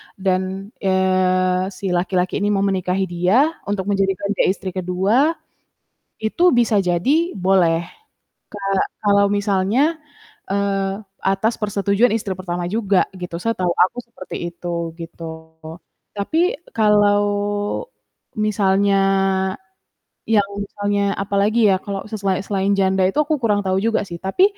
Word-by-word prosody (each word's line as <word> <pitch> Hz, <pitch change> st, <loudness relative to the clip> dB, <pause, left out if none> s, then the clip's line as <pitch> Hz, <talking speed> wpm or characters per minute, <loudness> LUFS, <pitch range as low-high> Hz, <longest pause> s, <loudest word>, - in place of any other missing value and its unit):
dan, 190 Hz, +1 st, -2 dB
eee, 185 Hz, -1 st, +2 dB
si 190 Hz, -1 st, -3 dB
laki-laki 180 Hz, +1 st, 0 dB
ini 205 Hz, -, 0 dB
mau 195 Hz, -, +1 dB
menikahi 190 Hz, -1 st, 0 dB
dia, 190 Hz, -, +3 dB, 0.2 s
untuk 205 Hz, -2 st, -1 dB
menjadikan 195 Hz, 0 st, 0 dB
dia -, -, +3 dB
istri 190 Hz, 0 st, -2 dB
ke-2 195 Hz, -, +1 dB, 0.9 s
itu 335 Hz, +10 st, +3 dB
bisa 235 Hz, -3 st, +3 dB
jadi 270 Hz, -, +1 dB
boleh. 180 Hz, -3 st, +2 dB, 0.7 s
Ka 205 Hz, -, -8 dB, 0.5 s
kalau 200 Hz, 0 st, +4 dB
misalnya, 205 Hz, -, +1 dB, 0.5 s
eee, 195 Hz, -1 st, 0 dB, 0.3 s
atas 195 Hz, +4 st, +1 dB
persetujuan 200 Hz, +2 st, +2 dB
istri 205 Hz, -4 st, -2 dB
pertama 175 Hz, -1 st, -3 dB
juga 200 Hz, -3 st, +2 dB
gitu. 175 Hz, -2 st, -5 dB
Setahu 185 Hz, -6 st, 0 dB
aku 185 Hz, +7 st, +2 dB
seperti 225 Hz, -6 st, -9 dB, 0.2 s
itu 170 Hz, -1 st, -4 dB
gitu. 165 Hz, 0 st, -8 dB, 0.9 s
Tapi 320 Hz, -, +1 dB, 0.2 s
kalau 205 Hz, -1 st, +4 dB, 1.1 s
misalnya 200 Hz, -1 st, +2 dB, 1.3 s
yang 205 Hz, -3 st, +3 dB
misalnya 205 Hz, 0 st, -2 dB, 0.2 s
apalagi 200 Hz, +3 st, +1 dB
ya 190 Hz, -, +4 dB
kalau 200 Hz, 0 st, -5 dB
se 215 Hz, -, -3 dB
sela 190 Hz, -2 st, 0 dB
selain 200 Hz, 0 st, 0 dB
janda 190 Hz, 0 st, +2 dB
itu 195 Hz, -, -3 dB
aku 305 Hz, +1 st, +1 dB
kurang 210 Hz, -3 st, +2 dB
tahu 190 Hz, 0 st, +1 dB
juga 225 Hz, -1 st, +2 dB
sih. 170 Hz, -, -6 dB
Tapi 195 Hz, -, +2 dB
195 Hz, 125 wpm, -20 LUFS, 185-210 Hz, 1.3 s, kalau